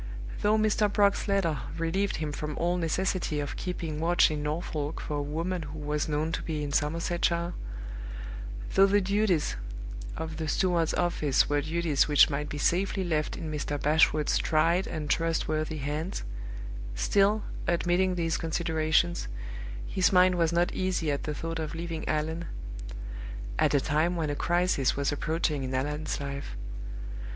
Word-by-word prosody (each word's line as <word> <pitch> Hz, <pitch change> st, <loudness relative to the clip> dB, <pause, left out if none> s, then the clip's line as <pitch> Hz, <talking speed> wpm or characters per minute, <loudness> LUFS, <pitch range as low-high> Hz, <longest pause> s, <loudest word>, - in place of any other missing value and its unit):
Though 210 Hz, +1 st, +4 dB
Mr. 215 Hz, -1 st, +3 dB
Brock's 200 Hz, 0 st, +3 dB
letter 190 Hz, -7 st, +1 dB, 0.2 s
relieved 180 Hz, +5 st, 0 dB
him 155 Hz, -1 st, -2 dB
from 150 Hz, 0 st, -4 dB
all 175 Hz, +1 st, +1 dB
necessity 175 Hz, -1 st, 0 dB
of 145 Hz, -1 st, -3 dB
keeping 165 Hz, -4 st, -3 dB
watch 170 Hz, 0 st, +4 dB
in 150 Hz, -1 st, -2 dB
Norfolk 150 Hz, 0 st, -2 dB
for 150 Hz, -, -3 dB
a -, -, 0 dB
woman 165 Hz, +5 st, -2 dB
who 150 Hz, 0 st, -7 dB
was 150 Hz, 0 st, -1 dB
known 155 Hz, +2 st, 0 dB
to -, -, -2 dB
be 155 Hz, -2 st, -3 dB
in 145 Hz, -, -3 dB
Somersetshire; 170 Hz, +3 st, +1 dB, 1.2 s
though 195 Hz, -, +7 dB
the 205 Hz, +1 st, +4 dB
duties 200 Hz, -4 st, +1 dB, 0.6 s
of 160 Hz, -1 st, -4 dB
the 160 Hz, -1 st, -3 dB
steward's 170 Hz, 0 st, +2 dB
office 155 Hz, -6 st, +2 dB
were 145 Hz, 0 st, +2 dB
duties 160 Hz, -1 st, +1 dB
which 150 Hz, 0 st, +6 dB
might 145 Hz, +1 st, -2 dB
be 150 Hz, -, -4 dB
safely 190 Hz, +6 st, +1 dB
left 155 Hz, -4 st, -1 dB
in 160 Hz, -2 st, -4 dB
Mr. 145 Hz, -1 st, -2 dB
Bashwood's 150 Hz, 0 st, +3 dB
tried 165 Hz, +4 st, +2 dB
and 155 Hz, -2 st, -4 dB
trustworthy 155 Hz, 0 st, 0 dB
hands 150 Hz, +5 st, -3 dB, 0.7 s
still, 205 Hz, -, +3 dB, 0.2 s
admitting 175 Hz, +2 st, +2 dB
these 165 Hz, -2 st, 0 dB
considerations, 160 Hz, 0 st, +1 dB, 0.6 s
his 185 Hz, -, +2 dB
mind 185 Hz, 0 st, +6 dB
was 170 Hz, -2 st, +2 dB
not 170 Hz, +1 st, +2 dB
easy 185 Hz, -5 st, 0 dB
at 140 Hz, -, -2 dB
the 150 Hz, -, -2 dB
thought 165 Hz, +2 st, -3 dB
of 155 Hz, 0 st, -3 dB
leaving 165 Hz, -1 st, -4 dB
Allan, 160 Hz, +2 st, -1 dB, 1.1 s
at -, -, +4 dB
a -, -, +5 dB
time 155 Hz, +6 st, +1 dB
when 160 Hz, -3 st, 0 dB
a -, -, -2 dB
crisis 175 Hz, -4 st, +2 dB
was 140 Hz, 0 st, +1 dB
approaching 150 Hz, -1 st, 0 dB
in 130 Hz, 0 st, -2 dB
Allan's 150 Hz, +4 st, -1 dB
life. 140 Hz, -, -5 dB
160 Hz, 155 wpm, -29 LUFS, 150-175 Hz, 1.2 s, though